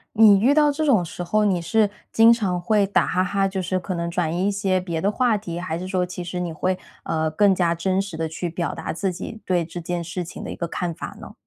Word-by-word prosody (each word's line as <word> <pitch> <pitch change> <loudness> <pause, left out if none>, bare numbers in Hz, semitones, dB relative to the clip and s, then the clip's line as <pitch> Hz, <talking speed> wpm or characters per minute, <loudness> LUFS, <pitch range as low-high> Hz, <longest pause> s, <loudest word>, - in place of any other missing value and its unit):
你 210 -3 +7
遇 240 +7 +4
到 295 0 +4
这 300 +2 -2
种 220 - +3
时 175 - -6
候， 210 +4 +1
你 185 -4 +1
是 205 +5 +2 0.2
经 225 +1 +7
常 195 -6 -1
会 200 +3 +2
打 200 - +2
哈 185 - +1
哈， 195 +1 +1
就 190 0 -3
是 185 +1 -1
可 185 +1 -4
能 170 -1 -2
转 170 -2 -1
移 185 +3 +1
一 - - +2
些 195 -2 +1
别 170 -3 -3
的 200 +5 +1
话 240 -1 +2
题， 175 -5 -6
还 175 -2 -3
是 180 +2 -5
说 185 -1 0
其 180 0 -6
实 175 +1 -4
你 175 -1 -2
会， 185 +4 -1 0.3
呃， 160 -1 0
更 195 +5 +4
加 175 -2 +1
真 185 +3 0
实 195 -5 -7
地 160 0 -1
去 160 +2 -4
表 170 +1 -3
达 - - -4
自 185 +3 -2
己 220 +5 -7
对 180 -2 +1
这 165 +2 -7
件 175 0 -3
事 175 +2 -4
情 170 - -9
的 - - -6
一 - - -5
个 170 - -3
看 175 0 -3
法 - - -7
呢？ - - -10
185 Hz, 295 characters per minute, -23 LUFS, 170-200 Hz, 0.3 s, 你